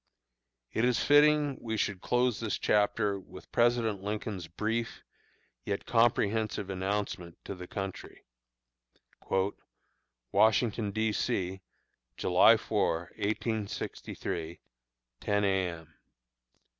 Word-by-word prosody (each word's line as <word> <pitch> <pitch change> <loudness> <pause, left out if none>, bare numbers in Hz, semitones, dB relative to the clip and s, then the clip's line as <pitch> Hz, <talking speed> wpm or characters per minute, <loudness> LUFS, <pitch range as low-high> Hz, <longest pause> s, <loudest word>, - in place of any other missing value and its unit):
It 110 - +1
is 125 -1 +2
fitting 145 -1 +4
we 110 -1 -3
should 100 -2 -1
close 125 -2 +1
this 110 -3 -2
chapter 105 -1 +1
with 95 0 -13
President 120 -4 +2
Lincoln's 100 -3 -4
brief 110 +7 -3 0.6
yet 100 -1 -3
comprehensive 110 -3 +1
announcement 95 -3 -3
to - - -4
the 90 -1 -9
country: 95 0 -6 2.1
WASHINGTON, 110 0 +3
D. 110 +2 0
C., 95 -6 -1 0.6
July - - +6
4, 85 +1 -1
1863, 105 -6 -3 0.6
10 100 0 0
A. 95 -2 +2
M. 80 -2 -9
105 Hz, 95 wpm, -30 LUFS, 95-115 Hz, 2.1 s, July